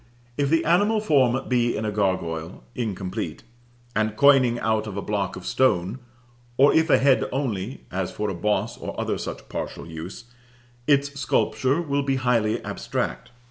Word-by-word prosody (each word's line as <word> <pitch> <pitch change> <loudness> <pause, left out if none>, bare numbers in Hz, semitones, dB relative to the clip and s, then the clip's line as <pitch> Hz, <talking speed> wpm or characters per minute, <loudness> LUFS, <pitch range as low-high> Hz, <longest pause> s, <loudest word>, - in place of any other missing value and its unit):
If 140 0 0
the 165 +1 +2
animal 205 +6 +3
form 135 - +2
be 120 -2 +1
in 110 - -2
a 105 - -1
gargoyle, 95 -5 -2
incomplete, 100 -6 -4 0.5
and 110 0 0
coining 135 -4 +5
out 110 -1 0
of 100 -2 -6
a - - -1
block 100 -3 -2
of 90 - -9
stone, 110 -3 +1 0.6
or 140 +2 +6
if 160 +1 +3
a - - +6
head 135 -1 +3
only, 125 -4 -3
as 95 0 -2
for 105 - -3
a 100 - -2
boss 105 +4 -1
or - - -6
other - - -1
such - - -6
partial - - -5
use, 85 +7 -8 0.6
its 140 0 +2
sculpture 135 +1 +1
will 140 -2 0
be 135 -1 0
highly 120 -4 +1
abstract. - - -3
120 Hz, 165 wpm, -24 LUFS, 100-140 Hz, 0.6 s, or